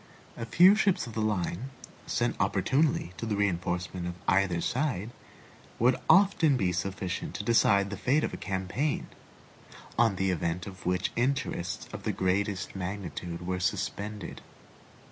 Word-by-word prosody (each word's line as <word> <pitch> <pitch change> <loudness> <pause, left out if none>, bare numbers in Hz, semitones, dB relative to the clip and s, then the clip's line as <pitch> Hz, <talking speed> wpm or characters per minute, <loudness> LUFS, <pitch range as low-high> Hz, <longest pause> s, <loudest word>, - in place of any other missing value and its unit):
A 115 - -5
few 180 - +7
ships 205 -3 +2
of 115 - -8
the 110 - -2
line, 105 +2 -1 0.4
sent - - 0
opportunely 135 - +1
to 115 - -4
the 105 - 0
reinforcement 90 -2 -1
of 90 - -4
either 95 -3 +3
side, 120 - -1 0.7
would 125 +2 +4
often 180 -7 +5
be 95 -6 +1
sufficient 90 0 -3
to - - -3
decide 100 -3 +3
the 100 - -4
fate 135 +9 +2
of - - -2
a - - -4
campaign, 100 +10 -2 0.9
on 115 -4 +4
the 95 0 +1
event 85 +1 -2
of 95 -3 -8
which 90 +1 0
interests 125 -8 -1
of - - -6
the - - -1
greatest 95 +1 -1
magnitude 90 -2 -5
were 90 0 -1
suspended. 100 +1 -3
100 Hz, 145 wpm, -29 LUFS, 90-120 Hz, 0.9 s, few